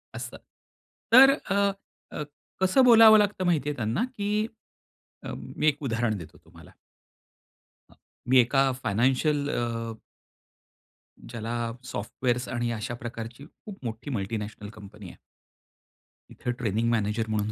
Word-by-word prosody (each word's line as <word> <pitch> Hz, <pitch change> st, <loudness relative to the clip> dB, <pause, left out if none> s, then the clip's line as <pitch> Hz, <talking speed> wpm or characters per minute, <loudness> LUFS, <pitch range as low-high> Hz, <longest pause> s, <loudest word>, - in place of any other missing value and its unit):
असतं. -, -, -7 dB, 0.8 s
तर 270 Hz, +2 st, +9 dB, 0.2 s
अ, 195 Hz, -, +1 dB, 0.6 s
अ, 150 Hz, -, -4 dB, 0.4 s
कसं 190 Hz, +8 st, +4 dB
बोलावं 225 Hz, -2 st, +9 dB
लागतं 205 Hz, -3 st, 0 dB
माहिती 155 Hz, -5 st, +1 dB
आहे 150 Hz, -, -3 dB
त्यांना? 115 Hz, -, -1 dB
की 210 Hz, +1 st, 0 dB, 0.8 s
अ, -, -, -6 dB
मी 155 Hz, -, -3 dB
एक 150 Hz, 0 st, +1 dB
उदाहरण 115 Hz, -4 st, -1 dB
देतो 80 Hz, -, -11 dB
तुम्हाला. -, -, -17 dB, 1.2 s
अ, -, -, -18 dB, 0.4 s
मी 130 Hz, -, +5 dB
एका 135 Hz, +2 st, +3 dB
फायनान्शियल 135 Hz, +7 st, +1 dB
अ, 115 Hz, -3 st, -3 dB, 1.4 s
ज्याला 115 Hz, 0 st, -3 dB, 0.2 s
सॉफ्टवेअर्स 120 Hz, +4 st, -2 dB
आणि 120 Hz, -1 st, -2 dB
अशा 115 Hz, +1 st, -4 dB
प्रकारची 120 Hz, +3 st, -8 dB
खूप 195 Hz, +4 st, -13 dB
मोठी 110 Hz, +5 st, -6 dB
मल्टिनॅशनल 105 Hz, -1 st, -4 dB
कंपनी 105 Hz, -2 st, -12 dB
आहे. -, -, -13 dB, 1.1 s
तिथं 125 Hz, -, -4 dB
ट्रेनिंग 115 Hz, 0 st, 0 dB
मॅनेजर 110 Hz, 0 st, 0 dB
म्हणून 105 Hz, 0 st, -1 dB
120 Hz, 125 wpm, -26 LUFS, 110-150 Hz, 1.4 s, तर